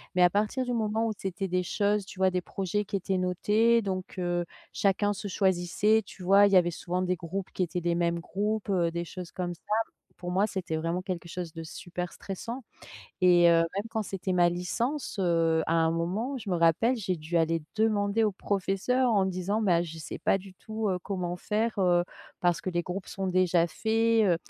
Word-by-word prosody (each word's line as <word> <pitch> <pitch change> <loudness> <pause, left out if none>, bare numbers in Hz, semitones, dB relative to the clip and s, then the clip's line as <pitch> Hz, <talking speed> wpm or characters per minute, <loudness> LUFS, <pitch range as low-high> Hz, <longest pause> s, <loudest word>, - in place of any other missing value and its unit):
Mais 180 - +3
à 175 - +7
partir 215 +7 0
du 245 - -3
moment 225 0 0
où - - 0
c'étaient 195 0 -3
des 180 0 +1
choses, 205 +1 0
tu 190 - -11
vois, 190 0 +4
des 180 - 0
projets 195 +3 -2
qui 200 - -4
étaient 190 0 -1
notés 210 +6 +3
donc, 190 -2 -4
heu, 175 -1 -1 0.3
chacun 205 +1 +1
se 205 0 -5
choisissait, 195 +3 +2
tu 185 - -11
vois? 200 +2 +6
Il 200 - -1
y - - +7
avait 175 -1 +3
souvent 180 +2 -3
des 180 -1 0
groupes 185 +2 -5
qui 185 - 0
étaient 175 +1 -3
des 170 0 +1
mêmes 170 0 +1
groupes, 205 +4 -2
heu, 175 -3 +2
des 170 0 -2
choses 180 0 -8
comme 175 -2 -3
ça. 170 - -16 0.6
Pour 180 0 -5
moi 195 +4 +2
c'était 180 -4 -3
vraiment 165 +3 -1
quelque 175 -2 -5
chose 175 -2 -5
de 165 0 -6
super 175 +2 -6
stressant. 230 +5 -6 0.6
Et 175 -1 +6
heu, - - +5 0.2
même 205 +3 -3
quand 220 -1 -2
c'était 190 -2 -3
ma 175 -1 +4
licence, 235 - -2
heu, 165 -3 +2
à 165 - 0
un 165 -1 +3
moment 190 +11 -1
je 215 -5 -6
me 175 - +2
rappelle 170 +10 +3
j'ai 185 -6 -2
dû 160 +2 -1
aller 165 0 +1
demander 215 0 +2
au 210 -2 +2
professeur 205 +7 0
en 200 -3 +3
disant: 190 +4 -1
«Bah, 175 -4 +3
je 165 -1 -7
sais 160 - -7
pas - - +2
du 190 0 -10
tout, 215 +2 -3
heu, 180 - 0
comment 180 -3 -3
faire, 220 +4 -1
heu, 175 -2 +3 0.4
parce 175 -1 +2
que - - -4
les 175 -1 0
groupes 185 +2 -5
sont 195 -1 -3
déjà 180 -2 +3
faits, 225 +4 +2
heu». 175 -2 +4
185 Hz, 215 wpm, -28 LUFS, 175-210 Hz, 0.6 s, à